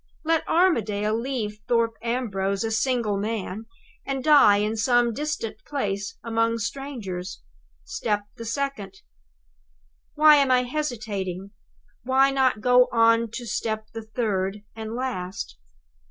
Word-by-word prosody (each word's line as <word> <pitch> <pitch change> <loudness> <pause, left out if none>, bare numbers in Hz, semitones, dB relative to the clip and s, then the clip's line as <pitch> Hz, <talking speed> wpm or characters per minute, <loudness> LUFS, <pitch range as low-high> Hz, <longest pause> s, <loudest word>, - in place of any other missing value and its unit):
Let 325 0 +2
Armadale 215 - +2
leave 225 -3 -3
Thorpe 230 -1 +2
Ambrose 200 -5 -1
a 225 - -2
single 225 -3 0
man, 215 0 -4 0.4
and 270 -1 -3
die 280 -9 +7
in 210 +2 0
some 240 +1 +2
distant 230 -5 -4
place 200 -8 -3
among 230 0 +1
strangers 210 - -5 0.4
step 210 - -1
the 230 - -8
second! 225 -6 -4 1.1
"Why 305 0 +7
am 280 -2 +3
I 250 -1 +4
hesitating? 215 - -4 0.5
Why 265 +3 +3
not 260 -5 +2
go 250 +1 +5
on 230 0 +4
to 240 +1 -5
step 220 -1 -3
the 225 - -5
third, 210 -3 -2
and 220 0 -6
last? 195 - -4
230 Hz, 125 wpm, -25 LUFS, 210-255 Hz, 1.1 s, die